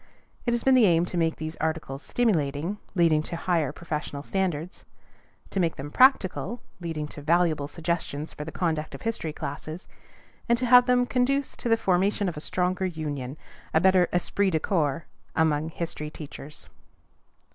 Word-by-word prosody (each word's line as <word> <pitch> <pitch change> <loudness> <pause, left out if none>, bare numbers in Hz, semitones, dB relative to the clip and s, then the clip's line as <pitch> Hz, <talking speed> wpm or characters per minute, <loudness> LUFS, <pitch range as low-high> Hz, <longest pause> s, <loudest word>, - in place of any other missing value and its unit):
It - - +3
has 235 - -1
been 265 - +5
the 245 -5 +6
aim 170 -1 +4
to 180 - -5
make 165 -1 +1
these 155 +1 -5
articles 155 -4 -3
stimulating, 170 - 0 0.2
leading 165 -4 +4
to 165 - -5
higher 165 -4 0
professional 150 -3 -5
standards; 180 -2 -2 0.7
to 195 - -1
make 170 -3 +1
them 145 +2 -7
practical, 245 - +3 0.2
leading 160 -4 -4
to 145 - -8
valuable 160 -2 +2
suggestions 160 -1 -3
for 150 - -6
the 160 - -7
conduct 160 -4 -2
of - - -11
history 225 -8 -2
classes; 155 +3 -6 0.6
and 235 - +5
to 250 - -1
have 250 +1 +7
them 250 0 +4
conduce 265 +2 0
to 240 - -3
the 225 - +5
formation 195 0 +1
of 175 - -3
a 150 - -6
stronger 185 +3 0
union, 145 -5 -4 0.4
a - - +7
better 185 0 +4
esprit 190 +3 +2
de 160 -3 +1
corps, 155 -3 0 0.3
among 160 -1 +2
history 160 -2 -4
teachers. 150 -1 -9
170 Hz, 170 wpm, -26 LUFS, 155-190 Hz, 0.7 s, have